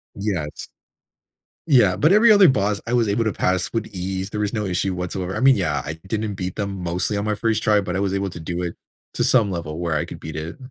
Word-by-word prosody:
Yes. 95 -8 -4 1.0
Yeah, 120 - +5
but 155 - +3
every 220 +2 +6
other 200 -3 +7
boss, 105 -6 +1
I 115 - -3
was 120 -2 +3
able 105 +3 +1
to 110 - -1
pass 90 +3 0
with 115 -1 -1
ease, 95 0 -4
there 105 - -4
was 105 -1 -1
no 105 -2 -1
issue 95 0 -1
whatsoever. 90 +1 -4
I - - -2
mean, 135 +1 +6
yeah, 75 -8 -1
I 80 - -4
didn't 105 0 -2
beat 90 -1 -4
them 100 -1 -3
mostly 90 +4 -1
on 100 - -2
my 105 - 0
first 110 +1 0
try, 105 -1 +3
but 90 -2 -4
I 95 - 0
was 100 -1 0
able 100 0 -1
to - - -8
do 85 +2 -4
it 85 -1 -4 0.4
to - - +1
some 115 -6 +3
level 85 -3 -4
where 85 -2 -1
I 75 - 0
could - - -9
beat 80 -1 -8
it. 80 +3 -6
100 Hz, 250 wpm, -22 LUFS, 90-110 Hz, 1.0 s, other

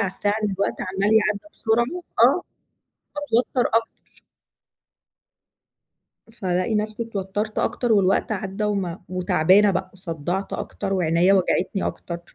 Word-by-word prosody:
على 200 - +1
الساعة 205 +1 0
إن 210 - 0
الوقت 195 +1 -2
عَمّال 195 +3 0
يعدّى 210 -2 +3
بسرعة 235 +10 0 0.2
آه، - - +5 0.7
باتوتّر 255 -3 +1
أكتر. 225 0 -4 2.5
فالاقي 185 +3 0
نفْسِي 215 +2 -2
اتوتّرت، 210 0 -3
أكتر 240 -2 0
والوقت 195 +1 +2
عدّى 195 +1 -3
وما 195 -4 -2
وتعبانة 185 +2 +4
بقى، 185 - -2
وصدّعت 180 +1 -4
أكتر 195 - -4
وعينيَّا 175 +1 +3
وجعتني 190 0 +1
أكتر. 170 -1 -6
195 Hz, 115 wpm, -23 LUFS, 185-215 Hz, 2.5 s, آه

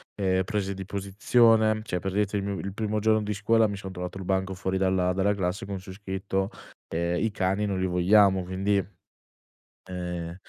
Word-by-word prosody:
ehm, 95 -2 +1
prese 100 -2 -2
di 95 -1 -7
posizione, 110 +3 +3
cioè 90 -5 -2
per 95 +1 -3
dirti 105 0 0
il 100 - -2
mio 100 -1 -2
il 100 0 -5
primo 105 0 -1
giorno 110 0 +3
di 105 0 -2
scuola 110 +2 +3
mi 100 - -4
sono 95 -1 -7
trovato 90 0 -6
il 95 - -6
banco 95 +1 0
fuori 95 0 -2
dalla 95 -1 +2
dalla 95 +2 +2
classe 95 +3 -2
con 100 -2 -5
su 95 - -10
scritto, 95 0 -3 0.4
ehm: 85 +1 -1
"I 110 - +1
cani 95 +2 0
non 95 -2 -1
li - - +1
vogliamo." 95 +2 +4
quindi 95 +2 +1 1.1
ehm 90 -2 -4
95 Hz, 195 wpm, -27 LUFS, 95-105 Hz, 1.1 s, vogliamo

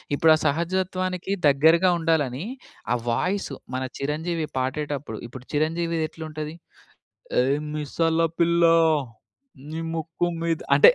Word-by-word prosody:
ఇప్పుడు 160 +2 +5
ఆ - - 0
సహజత్వానికి 185 +4 -1 0.2
దగ్గరగా 160 +6 +5
ఉండాలని 160 -2 0 0.5
ఆ - - +3 0.2
వాయిస్ 185 +11 0 0.3
మన 130 - -1 0.2
చిరంజీవి 155 +3 -2
పాడేటప్పుడు, 135 -2 -2
ఇప్పుడు 125 +1 -11
చిరంజీవిదెట్లుంటది 155 -1 -2 0.9
ఏ - - +3 0.3
మిసల 160 +2 0 0.2
పిల్ల, 170 0 +3 1.1
నీ 160 +1 -4
ముక్కు 165 +1 -2
మీద 165 -1 0 0.2
అంటే 140 - +9
160 Hz, 105 wpm, -25 LUFS, 145-170 Hz, 1.1 s, అంటే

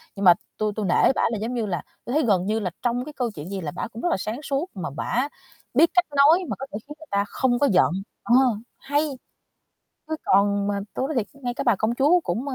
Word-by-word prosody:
Nhưng 200 -1 -2
mà 175 - +10 0.2
tui 215 -1 0
tui 215 -2 -2
nể 180 - +4
bả - - +1
là, 225 - -1
giống 235 +3 -2
như 230 -3 -1
là, 180 -4 -2 0.2
tui 245 - -4
thấy 310 - +3
gần 190 -4 +2
như 215 +2 0
là 190 -4 -2
trong 245 +1 0
cái 300 - -8
câu 245 -4 -1
chuyện 155 +4 -7
gì 195 -1 -4
là 150 -3 -4
bả - - -4
cũng 230 0 -9
rất 350 - +1
là - - +3
sáng 220 +7 -4
suốt, 280 +6 -2
mà 180 - -4
bả 250 - 0 0.5
biết 335 - +5
cách 360 -1 +4
nói 320 +6 +6
mà - - -1
có 270 - -4
thể 205 - -4
khiến 295 - -7
người 315 - -13
ta 200 0 +2
không 245 -2 +1
có 285 - +4
giận, 180 - +4 0.3
ờ, 240 - +3 0.4
hay. 285 +2 0 1.1
Chứ 315 - -1
còn 200 +1 +3
mà 200 -1 -1
tui 265 - -1
nói 310 - -3
thiệt, 215 -4 +1 0.2
ngay 245 -1 -2
cái - - -3
bà 235 -5 +4
công 220 +4 0
chúa 300 +8 +4
cũng, 275 -2 -3
ơ, 265 - -3
235 Hz, 270 wpm, -24 LUFS, 200-280 Hz, 1.1 s, mà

